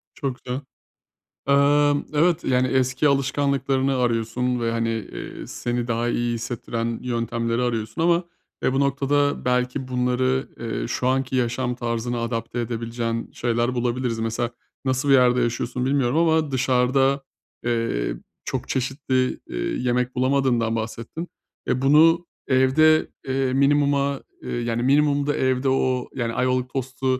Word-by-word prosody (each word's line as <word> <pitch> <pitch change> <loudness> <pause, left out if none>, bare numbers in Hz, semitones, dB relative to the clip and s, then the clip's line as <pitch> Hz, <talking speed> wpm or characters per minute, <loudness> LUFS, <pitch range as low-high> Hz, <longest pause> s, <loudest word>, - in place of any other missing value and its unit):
Çok 135 -3 -3
güzel. 130 +2 -3 0.9
Emm, 145 +1 +4
evet, 165 +3 +2
yani, 130 0 +2
eski 130 +2 +2
alışkanlıklarını 135 -1 +1
arıyorsun 120 +1 0
ve, 115 -1 0
hani, 115 -1 -2
iii, - - -7
seni 120 0 -3
daha 120 +1 0
iyi 120 0 0
hissettiren 115 0 -3
yöntemleri 115 0 -1
arıyorsun 115 +3 -2
ama, 170 +1 +3 0.4
e, - - +2
bu 135 - +1
noktada 145 +1 +1
belki 125 +1 0
bunları, 130 +1 0
eee, 115 0 -3
şu 125 - -2
anki 130 0 0
yaşam 125 0 0
tarzına 120 0 -2
adapte 115 +1 -3
edebileceğin 115 0 -3
şeyler 120 +1 0
bulabiliriz. 120 -1 -1
Mesela 115 +1 -1 0.3
nasıl 130 +1 0
bir 135 - +6
yerde 125 -1 +5
yaşıyorsun 120 +1 -1
bilmiyorum 135 -1 +1
ama 160 -2 +2
dışarıda, 130 +1 +2 0.4
eee, 115 - -1 0.3
çok - - -4
çeşitli, 130 0 -1
iii, - - -3
yemek 125 +1 0
bulamadığından 130 -3 +1
bahsettin. 115 +9 -5 0.4
E, 130 - 0
bunu 165 +5 +5 0.2
evde, 140 +4 +4 0.2
eee, 130 -1 0
minimuma, 140 0 +2 0.2
yani, 120 -1 -2
minimumda 145 +2 +2
evde 130 +1 +1
o, 130 -1 +1
yani, 120 -3 -2
Ayvalık 125 +1 0
tostu, 130 0 -4
125 Hz, 130 wpm, -23 LUFS, 120-135 Hz, 0.9 s, bir